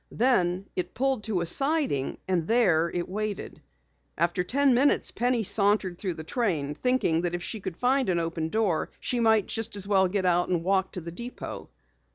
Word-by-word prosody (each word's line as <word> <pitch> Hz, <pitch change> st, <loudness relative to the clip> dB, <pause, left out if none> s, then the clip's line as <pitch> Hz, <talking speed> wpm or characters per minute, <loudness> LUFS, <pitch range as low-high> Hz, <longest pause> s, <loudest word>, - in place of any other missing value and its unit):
Then 190 Hz, -7 st, +1 dB
it 180 Hz, -1 st, -4 dB
pulled 265 Hz, -3 st, 0 dB
to 205 Hz, -6 st, -1 dB
a -, -, -1 dB
siding 270 Hz, -, +1 dB
and 175 Hz, -3 st, 0 dB
there 180 Hz, -9 st, +3 dB
it 175 Hz, 0 st, -3 dB
waited. 210 Hz, +1 st, -5 dB, 0.6 s
After 175 Hz, +1 st, +1 dB
ten 270 Hz, +7 st, +3 dB
minutes 270 Hz, +4 st, +2 dB
Penny 245 Hz, -1 st, 0 dB
sauntered 200 Hz, -3 st, +2 dB
through 185 Hz, -4 st, -3 dB
the 160 Hz, -, -7 dB
train, 160 Hz, -, -1 dB
thinking 210 Hz, -, +1 dB
that 175 Hz, 0 st, -2 dB
if 175 Hz, -, -5 dB
she 220 Hz, -, -4 dB
could 185 Hz, -3 st, -6 dB
find 260 Hz, -1 st, +1 dB
an 175 Hz, -, +1 dB
open 165 Hz, -1 st, -3 dB
door, 200 Hz, -5 st, 0 dB
she 245 Hz, -, -1 dB
might 220 Hz, -3 st, +3 dB, 0.7 s
get 195 Hz, -2 st, -1 dB
out 175 Hz, 0 st, +2 dB
and 175 Hz, -2 st, 0 dB
walk 190 Hz, +1 st, 0 dB
to 180 Hz, -, -4 dB
the 170 Hz, +1 st, -7 dB
depot. 235 Hz, +8 st, -7 dB
190 Hz, 180 wpm, -27 LUFS, 175-235 Hz, 0.7 s, there